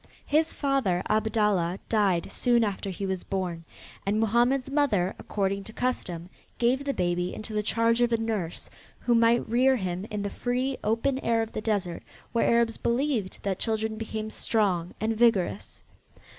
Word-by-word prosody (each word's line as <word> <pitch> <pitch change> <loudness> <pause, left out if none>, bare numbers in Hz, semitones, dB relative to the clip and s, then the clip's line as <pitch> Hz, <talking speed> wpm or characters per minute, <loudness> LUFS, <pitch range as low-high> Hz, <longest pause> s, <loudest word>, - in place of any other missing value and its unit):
His 315 +2 +2
father, 265 - 0
Abdallah, 210 -5 +1
died 200 -6 +1
soon 240 -1 +3
after 200 -2 -2
he 195 +1 -4
was 190 -2 -2
born, 180 -4 -3 0.4
and 205 +2 0
Mohammed's 240 +5 +2
mother, 215 -11 +2
according 200 -1 -1
to 220 - -11
custom, 180 -10 -2 0.3
gave 250 +3 +2
the 280 - 0
baby 175 0 -1
into 215 0 -7
the 210 - +1
charge 230 +2 +2
of 240 0 +3
a 230 - +3
nurse 215 -7 -3 0.3
who 240 - +2
might 230 0 +4
rear 255 +4 +4
him 185 -2 -3
in 210 -2 -3
the 200 - -3
free, 255 +2 -1
open 230 +5 +1
air 230 -3 +1
of 225 - -7
the - - -4
desert 195 -6 -1 0.3
where 230 - +2
Arabs 235 -1 +3
believed 235 -5 -1
that 195 -2 -1
children 220 -1 -1
became 220 0 -4
strong 185 -8 0
and 220 +1 0
vigorous. 200 - +1
220 Hz, 165 wpm, -27 LUFS, 195-235 Hz, 0.4 s, might